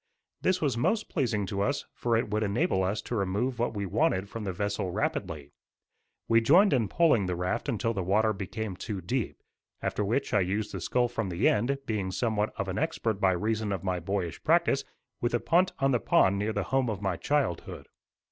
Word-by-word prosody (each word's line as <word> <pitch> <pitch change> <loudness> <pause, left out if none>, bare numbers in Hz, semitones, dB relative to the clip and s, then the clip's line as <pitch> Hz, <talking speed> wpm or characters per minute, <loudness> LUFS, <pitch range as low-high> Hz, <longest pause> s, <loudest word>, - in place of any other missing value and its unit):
This 185 0 +1
was 135 -7 0
most 220 - +1
pleasing 115 - 0
to 100 0 -3
us 140 +7 0
for 115 -1 +1
it 115 -2 -2
would 105 +1 0
enable 105 - +1
us 100 +3 -1
to 120 - -4
remove 110 +5 -1
what 120 -1 0
we 100 -1 -2
wanted 95 +1 +1
from 110 +1 -6
the 95 - -1
vessel 100 +1 -2
rapidly. 85 -6 -3 0.8
We 115 0 +4
joined 175 - +5
in 120 -6 +2
poling 120 - +3
the 90 - -1
raft 90 +10 -2
until 115 -1 0
the 100 - -2
water 105 +4 +2
became 100 +1 -5
too 100 +1 -5
deep, 115 +7 -3 0.4
after 105 - -1
which 115 +8 -1
I 105 - +5
used 100 +3 -1
the 95 - -5
scull 120 +7 +1
from 115 -4 -3
the 85 +2 +1
end, 120 +7 +2
being 105 -4 -2
somewhat 105 +2 0
of - - -2
an - - -2
expert 110 -3 -1
by 95 -1 +4
reason 110 +3 -1
of 95 -2 -3
my 95 -2 -1
boyish 90 -1 -3
practice - - +3 0.4
with 120 0 +1
a - - +2
punt 175 - +3
on 135 0 +2
the 120 - +2
pond 100 -1 +3
near 105 +2 0
the - - -1
home 135 -2 +2
of 105 -2 -4
my 95 -2 0
childhood. 140 - -2
105 Hz, 210 wpm, -28 LUFS, 95-120 Hz, 0.8 s, joined